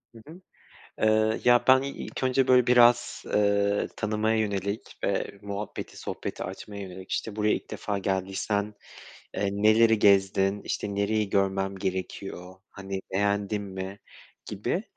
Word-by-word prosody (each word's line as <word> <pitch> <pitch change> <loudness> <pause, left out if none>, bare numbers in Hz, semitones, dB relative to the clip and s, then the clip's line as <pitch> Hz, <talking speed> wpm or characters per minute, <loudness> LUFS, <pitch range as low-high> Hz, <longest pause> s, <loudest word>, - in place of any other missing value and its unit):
Hı 115 - -12
hı. 170 +4 -12 0.6
Eee, 110 0 +2
ya, 120 0 +5
ben 130 0 +7
i 140 - -3
ilk 140 - -7
önce 130 0 +2
böyle 125 -1 +5
biraz, 120 0 +4
eee, 100 0 +2
tanımaya 110 +1 0
yönelik 100 -1 -1 0.2
ve 100 - -2
muhabbeti, 100 0 -6
sohbeti - - -5
açmaya 100 -1 -7
yönelik 95 0 -10
işte 110 -2 -3
buraya 105 0 +2
ilk - - -7
defa 100 -1 -3
geldiysen, 100 +2 -2 0.6
eee, 100 - 0
neleri 110 +2 +4
gezdin? 100 0 +3
İşte 100 -1 -3
nereyi 100 +1 0
görmem 95 0 0
gerekiyor? 95 0 -5 0.2
Hani, 95 -1 -6
beğendin 100 +1 0
mi 95 0 -6 0.5
gibi, 105 - -2
100 Hz, 135 wpm, -27 LUFS, 95-110 Hz, 0.6 s, ben